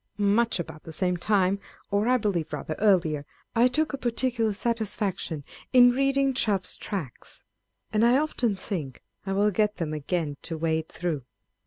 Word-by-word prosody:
Much 210 +1 +2
about 160 -2 -6
the 160 - -10
same 180 +2 0
time, 195 +1 +2 0.3
or 205 +2 +2
I 255 +1 +4
believe 195 -8 -1
rather 155 - -3
earlier, 175 -8 +3 0.3
I 235 +2 +6
took 305 +4 0
a 275 - -3
particular 240 -2 0
satisfaction 205 -7 -2 0.3
in 245 -1 +8
reading 275 +1 +2
Chubb's 205 -7 +1
Tracts,1 175 - -6 0.5
and 215 +1 +3
I 245 +2 +5
often 255 -7 0
think 170 - -5 0.2
I 195 - 0
will 205 +2 +3
get 210 +1 +1
them 160 -3 -2
again 155 -1 -2
to 165 -2 -5
wade 160 0 -1
through. 160 -7 -3
200 Hz, 160 wpm, -27 LUFS, 165-235 Hz, 0.5 s, in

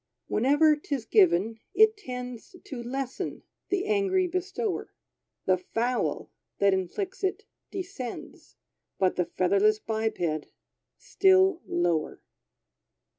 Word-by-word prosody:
Whenever 290 +6 +4
'tis 280 -5 -4
given, 225 - +3 0.2
it 440 +1 +6
tends 250 - -7
To 255 -4 -6
lessen 260 +2 -4 0.3
the 390 0 0
angry 395 -3 +2
bestower. 370 +4 -3 0.5
The 185 -1 +3
fowl 240 +6 -2 0.3
that 200 -1 +4
inflicts 355 - -3
it 380 - -1 0.3
descends 365 -11 -7 0.4
But 185 -1 +2
the 180 - +1
featherless 200 +5 +2
biped, 220 0 -2 0.8
still 380 -2 +3
lower. 175 -3 0
260 Hz, 100 wpm, -27 LUFS, -, 0.8 s, it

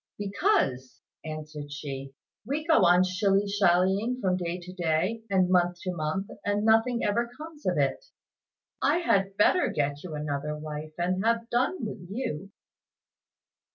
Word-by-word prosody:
"Because," 200 - 0 0.2
answered 155 -2 -7
she, 135 -2 -6 0.3
"we 285 +7 -3
go 320 - +5
on 175 +1 +6
shilly 195 +2 +1
shallying 200 +4 +2
from 185 -6 +1
day 175 0 -3
to 180 +1 -10
day, 180 +5 0
and 190 -2 +3
month 175 -1 +2
to 185 - -2
month, 170 +4 -3
and 205 +1 0
nothing 225 +2 +3
ever 235 +3 +1
comes 310 0 -9
of - - +1
it. - - +1 0.8
I - - +3
had 195 - +1
better 360 - +4
get 145 0 -1
you 170 -4 -6
another 150 0 -3
wife 155 0 -7
and 185 +2 0
have 230 +1 0
done 260 +4 0
with 185 -4 -7
you." 195 - -4
185 Hz, 150 wpm, -28 LUFS, 155-225 Hz, 0.8 s, on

